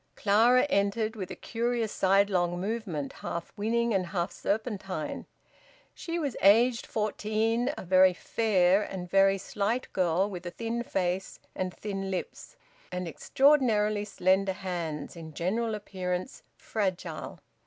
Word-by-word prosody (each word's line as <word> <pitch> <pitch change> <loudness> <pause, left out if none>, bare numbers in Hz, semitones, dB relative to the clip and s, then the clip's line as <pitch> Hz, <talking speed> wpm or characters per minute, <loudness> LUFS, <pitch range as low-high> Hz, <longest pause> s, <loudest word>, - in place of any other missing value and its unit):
Clara 230 +5 +4
entered, 215 -2 0
with 190 -4 -5
a - - -6
curious 235 -1 -2
sidelong 190 -2 +2
movement, 190 -8 -3
half 170 -1 -6
winning 230 +2 0
and 185 -2 0
half 175 0 -2
serpentine. 200 -7 -3 0.7
She 335 0 -4
was 285 -7 -2
aged 230 +5 +5
fourteen, 220 +3 0
a - - -6
very 185 +1 +6
fair 195 -2 +2
and 190 -3 -5
very 195 +1 +4
slight 210 +5 -2
girl, 185 +1 +2
with 185 -4 -7
a - - -2
thin 230 +5 -3
face 190 -4 -2 0.2
and 185 -1 -2
thin 195 0 -5
lips, 190 - -5 0.4
and 180 0 -3
extraordinarily 215 - +3
slender 190 -1 +1
hands; 175 -6 -4
in 160 -2 -10
general 220 +6 -1
appearance 185 0 -4 0.2
fragile. 190 -5 -3
200 Hz, 130 wpm, -29 LUFS, 185-225 Hz, 0.7 s, very